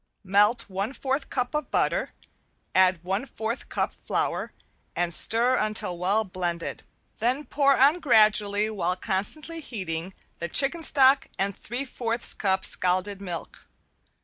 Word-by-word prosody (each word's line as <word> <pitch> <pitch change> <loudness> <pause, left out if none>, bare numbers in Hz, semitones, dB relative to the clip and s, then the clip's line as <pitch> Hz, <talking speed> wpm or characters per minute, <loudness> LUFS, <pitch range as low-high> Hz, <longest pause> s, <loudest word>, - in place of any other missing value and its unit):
Melt 205 +4 +3
one 200 +5 -3
fourth 275 +1 -3
cup 250 0 -2
of 300 -1 -3
butter, - - 0 0.6
add 185 -2 +3
one 195 +8 -2
fourth 225 +1 -5
cup - - -2
flour, - - -3 0.4
and 170 0 +1
stir 235 +7 +5
until 215 -4 -1
well 195 +5 +1
blended, 175 -3 -4 0.4
then 255 +6 0
pour 280 -1 +2
on 285 +6 +4
gradually 215 -6 +3
while 180 -3 -1
constantly 225 - -2
heating 185 - -5 0.2
the 170 - -4
chicken 285 - +2
stock 270 -3 +4
and 195 0 -1
three 245 +5 -5
fourths 235 -2 -1
cup 190 -2 -1
scalded 185 +2 0
milk. 175 -4 -7
210 Hz, 135 wpm, -25 LUFS, 185-260 Hz, 0.6 s, stir